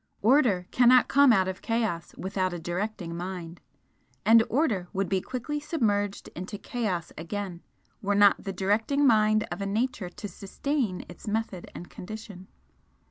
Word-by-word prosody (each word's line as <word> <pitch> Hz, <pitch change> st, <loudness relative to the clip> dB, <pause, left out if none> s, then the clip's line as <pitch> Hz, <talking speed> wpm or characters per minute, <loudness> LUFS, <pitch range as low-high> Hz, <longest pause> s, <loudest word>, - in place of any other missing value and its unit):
Order 225 Hz, -7 st, +4 dB
cannot 250 Hz, 0 st, +6 dB
come 280 Hz, -1 st, +6 dB
out 190 Hz, -4 st, +3 dB
of 190 Hz, 0 st, -4 dB
Chaos 220 Hz, -8 st, -2 dB
without 185 Hz, -1 st, -1 dB
a 175 Hz, -, -4 dB
directing 175 Hz, 0 st, -4 dB
Mind; 175 Hz, -1 st, -6 dB, 0.6 s
and 225 Hz, +1 st, +7 dB
Order 230 Hz, -, +1 dB
would 195 Hz, 0 st, 0 dB
be 190 Hz, -1 st, 0 dB
quickly 260 Hz, +6 st, -4 dB
submerged 210 Hz, -10 st, -1 dB
into 185 Hz, +4 st, -6 dB
Chaos 200 Hz, -6 st, -3 dB
again 180 Hz, +1 st, -5 dB, 0.4 s
were 205 Hz, 0 st, 0 dB
not 205 Hz, 0 st, +5 dB
the 195 Hz, -, -3 dB
directing 215 Hz, +10 st, +1 dB
Mind 215 Hz, -3 st, +4 dB
of -, -, -4 dB
a 200 Hz, -, -2 dB
nature 215 Hz, -2 st, -1 dB
to 205 Hz, -, -7 dB
sustain 205 Hz, -, -3 dB
its 175 Hz, -, -12 dB
method 210 Hz, -4 st, -3 dB
and 175 Hz, -, -8 dB
condition. 200 Hz, -1 st, -9 dB
205 Hz, 150 wpm, -27 LUFS, 185-230 Hz, 0.6 s, and